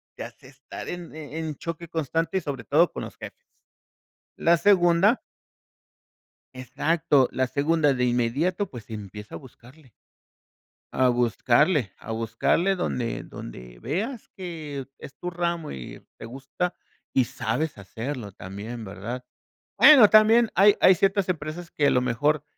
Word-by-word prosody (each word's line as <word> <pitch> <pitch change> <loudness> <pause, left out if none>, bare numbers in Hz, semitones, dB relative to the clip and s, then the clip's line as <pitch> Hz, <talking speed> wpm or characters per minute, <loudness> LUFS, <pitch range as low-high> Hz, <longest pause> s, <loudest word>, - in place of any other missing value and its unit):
te - - -7
hace - - -12
estar - - -10
en 175 -2 -7
e 155 0 -8
en 155 -2 -4
choque 165 0 -6
constante 165 +3 -1
y - - -1
sobre 135 -4 -5
todo 160 +7 +3
con - - -6
los - - -9
jefes. - - -11 0.9
La 170 +1 +3
segunda 185 +4 +4 1.3
Exacto, 140 +2 +1
la 130 0 0
segunda 145 +1 +1
de 125 0 0
inmediato, 140 - 0
pues, 115 -4 -11
empieza 105 -1 -8
a - - -5
buscarle 130 +1 -17 1.0
a 130 -1 +3
buscarle, 120 - +2
a 115 - -7
buscarle 115 - 0
donde 120 -9 -2
donde - - -10
veas 210 - -4
que 155 -7 -6
es 135 - -11
tu 180 - -5
ramo, 170 -2 -3
y - - -10
te - - -8
gusta, 135 +9 -4 0.4
y 130 - +3
sabes 120 +4 -3
hacerlo 110 +2 -6
también, 105 +6 -8
¿verdad?, 105 +6 -7 0.6
bueno 260 -9 +9
también 220 +2 +6
hay 200 +3 +6
hay 185 - +7
ciertas 195 +1 +1
empresas 165 +1 -4
que 145 - 0
a - - +5
lo 125 - +3
mejor 145 +5 0
145 Hz, 145 wpm, -25 LUFS, 120-170 Hz, 1.3 s, bueno